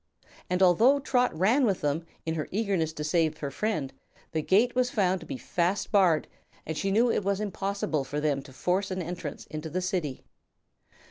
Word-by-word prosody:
And, 180 +1 +2
although 225 +10 +5
Trot 250 -2 +2
ran 225 - +3
with 200 -6 +1
them, 150 +3 -1 0.2
in 160 - -1
her 155 -2 -3
eagerness 195 -6 0
to 150 - -5
save 155 0 +1
her 145 -3 -4
friend, 155 -6 -2 0.4
the 160 - 0
gate 215 +10 +3
was 250 0 +2
found 190 -5 +1
to - - -12
be 275 - -4
fast 185 -2 -1
barred 180 -7 +4 0.4
and 160 - -4
she 195 - -1
knew 230 +4 +3
it - - 0
was 200 0 0
impossible 200 -7 -2
for 145 +2 -4
them 145 -2 0
to 135 - -14
force 180 +8 0
an 185 -1 -3
entrance 170 -3 -6
into 155 +1 -6
the 180 - -2
City. 180 -7 -2
180 Hz, 195 wpm, -28 LUFS, 155-205 Hz, 0.4 s, although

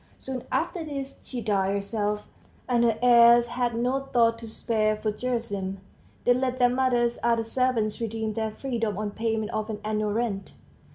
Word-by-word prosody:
Soon 260 -2 -5
after 350 -4 -1
this 275 -3 -6
she 250 -2 -5
died 200 -2 +1
herself; 210 +1 -2 0.4
and 240 -2 +2
her 230 -2 +3
heirs 235 -1 +7
had 240 0 -1
no 250 +3 +1
thought 235 -4 +2
to 230 - -8
spare 215 -1 0
for 215 0 -2
Gerasim; 210 -5 -3 0.5
they 245 - +6
let 255 0 -1
their 245 -1 +4
mother's 245 -2 +1
other 230 -1 +2
servants 230 -2 0
redeem 220 -1 -2
their 220 0 -1
freedom 225 -3 -3
on 210 -1 -2
payment 220 0 -2
of 215 0 -3
an 210 -1 -4
annual 215 -1 0
rent. 215 -4 -2
230 Hz, 170 wpm, -26 LUFS, 215-245 Hz, 0.5 s, heirs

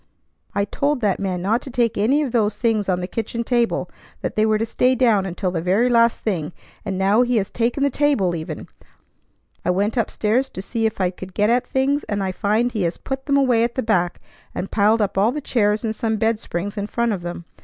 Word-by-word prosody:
I 200 0 +1
told 280 +5 -1
that 205 -4 +1
man 185 -3 -2
not 225 +5 +1
to - - -8
take 235 -2 +1
any 265 +9 +2
of 270 - -3
those 215 -3 +1
things 215 -4 0
on 180 -1 +1
the 180 - -3
kitchen 230 +3 -3
table, 240 -1 0 0.3
that - - -3
they 215 0 +3
were 215 0 +3
to 225 - -1
stay 250 +3 +2
down 225 -6 +3
until 180 +1 -2
the 170 -2 -2
very 195 +8 +2
last 235 -1 +3
thing, 175 -7 -2 0.3
and 195 -3 -3
now 200 +4 +3
he 245 -1 +2
has 195 -2 -1
taken 240 +4 0
the 280 - +2
table 245 -12 +1
even! 160 -1 -6 1.0
I - - -1
went 205 +6 +1
up 225 - 0
stairs 240 +5 0
to 185 - -7
see 225 +2 0
if 220 - -6
I 180 -2 +1
could 185 0 -10
get 210 +2 +3
at 245 +1 +1
things, 275 +2 +1
and 205 -2 -2
I 190 - -1
find 215 +6 +1
he 220 -3 -2
has 170 -1 -1
put 270 +1 -5
them 280 -1 +3
away 250 -4 +3
at 235 0 -1
the 260 - -1
back, 180 -6 +1 0.4
and 195 - -4
piled 215 +1 +3
all 205 +4 +3
the 300 - -3
chairs 215 -6 +1
and 220 -1 -2
some 220 -1 -1
bed 225 0 +1
springs 200 +2 -4
in 205 - -3
front 235 +1 0
of 190 - -4
them. 175 0 -6
220 Hz, 240 wpm, -21 LUFS, 195-240 Hz, 1.0 s, they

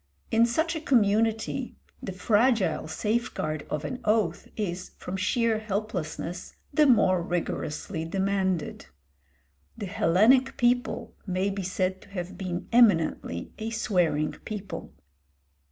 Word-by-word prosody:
In 230 +1 +5
such 320 +8 0
a 320 - -3
community 225 0 +1 0.3
the 195 - -4
fragile 215 +1 +2
safeguard 160 -6 -2
of 150 0 -3
an 255 - -4
oath 210 -6 +1
is, 185 -4 -3
from 180 - -5
sheer 220 +3 +1
helplessness, 190 -5 -4 0.2
the 300 0 +5
more 185 -8 +4
rigorously 170 0 -3
demanded. 190 - -1 0.9
The - - -4
Hellenic 215 +10 +3
people 245 0 +1
may 185 +2 0
be 195 0 -3
said 185 0 -1
to - - -17
have 180 -2 -5
been 180 -2 -4
eminently 165 - +3
a 220 +1 -3
swearing 175 -9 +1
people. 210 -2 -6
200 Hz, 120 wpm, -27 LUFS, 180-225 Hz, 0.9 s, In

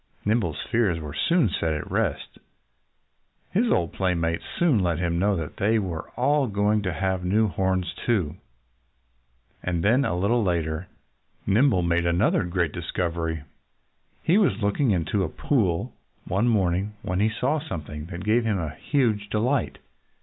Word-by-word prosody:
Nimble's 100 -9 0
fears 110 -8 +2
were 75 -2 -7
soon 170 - +2
set 80 -4 -1
at 75 - -6
rest. - - -2 1.1
His 225 +7 +2
old 85 -2 +1
playmates 85 -3 0
soon 160 -10 +3
let 85 -4 +1
him 85 0 0
know 100 +2 +2
that 80 -4 -5
they 110 +3 +2
were 90 -6 -3
all 140 +2 +2
going 105 0 +1
to 95 -2 -2
have 95 +2 -1
new 105 +5 +2
horns 95 -2 -1
too. 95 -11 0 1.2
And 85 -2 -2
then, 120 +7 +4
a 90 - -1
little 110 +6 +2
later, 85 -2 -1 0.6
Nimble 105 -2 +3
made 85 0 +1
another 85 +5 +2
great 85 -2 0
discovery. 80 -3 -3 0.8
He 185 +6 +4
was 115 - +2
looking 105 +6 +1
into 95 +1 +1
a 85 - -2
pool 95 - 0 0.3
one 100 +6 +1
morning 100 -2 +1
when 90 +1 -1
he 110 +2 +3
saw 130 +7 0
something 80 - -6
that 85 0 -7
gave 115 +3 +3
him 110 -3 0 0.2
huge 110 -8 0
delight. 120 +6 0
95 Hz, 150 wpm, -25 LUFS, 85-115 Hz, 1.2 s, then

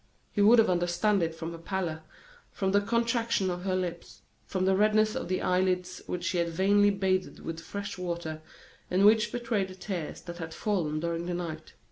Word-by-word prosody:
He 205 - 0
would 220 +4 +7
have 225 - +6
understood 175 +3 +2
it 165 -1 -1
from 165 0 -5
her 165 - -8
pallor, 165 -3 -3 0.5
from 190 -1 -1
the 205 +1 +4
contraction 230 -3 +1
of 180 +1 -5
her 185 -1 +1
lips, 175 -2 -5 0.2
from 185 -1 -1
the 190 0 +4
redness 215 +1 +3
of 260 - -3
the 185 +1 -1
eyelids 185 0 0
which 180 -1 -3
she 180 -1 0
had 170 0 +1
vainly 200 +4 +4
bathed 190 -2 0
with 165 0 -5
fresh 200 +4 -6
water, 170 -3 -4 0.5
and 190 +2 +3
which 220 +1 +5
betrayed 230 -5 -1
the 185 - -10
tears 180 -4 -5
that 175 -1 -8
had 160 -1 -6
fallen 170 -8 -1
during 170 +1 -2
the 175 - -2
night. 160 -3 -6
185 Hz, 195 wpm, -29 LUFS, 170-205 Hz, 0.5 s, would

